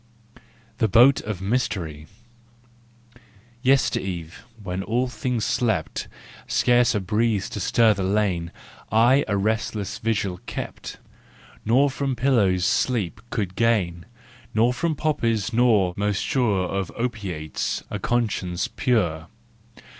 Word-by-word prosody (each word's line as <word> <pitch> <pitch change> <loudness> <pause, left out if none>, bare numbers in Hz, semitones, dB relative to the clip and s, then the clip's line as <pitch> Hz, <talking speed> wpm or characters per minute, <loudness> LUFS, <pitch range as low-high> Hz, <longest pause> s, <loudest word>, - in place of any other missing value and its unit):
THE 110 - +3
BOAT 120 +7 +6
OF 100 -3 -5
MYSTERY. 90 -9 -2 1.5
Yester 135 +1 +3
eve, 85 -2 -6 0.2
when 90 0 -3
all 120 +6 0
things 125 -2 -2
slept— 100 -10 -1 0.4
Scarce 120 -1 +3
a - - +2
breeze 105 +2 0
to - - -5
stir 110 +3 +4
the 100 - -5
lane— 95 -4 0 0.4
I 120 +6 +5
a 100 -2 0
restless 105 0 -2
vigil 105 -6 -1
kept, - - -6 0.7
Nor 135 +5 +3
from 135 -1 -2
pillows 105 -8 +2
sleep 105 -4 0
could 100 -6 -3
gain, 95 -8 0 0.5
Nor 115 +3 +3
from 160 +4 -1
poppies 115 -8 0
nor—most 105 -4 +2
sure 105 -8 +1
Of 95 0 -3
opiates—a 100 -10 -3
conscience 100 -7 -1
pure. 85 - 0
110 Hz, 110 wpm, -24 LUFS, 95-120 Hz, 1.5 s, BOAT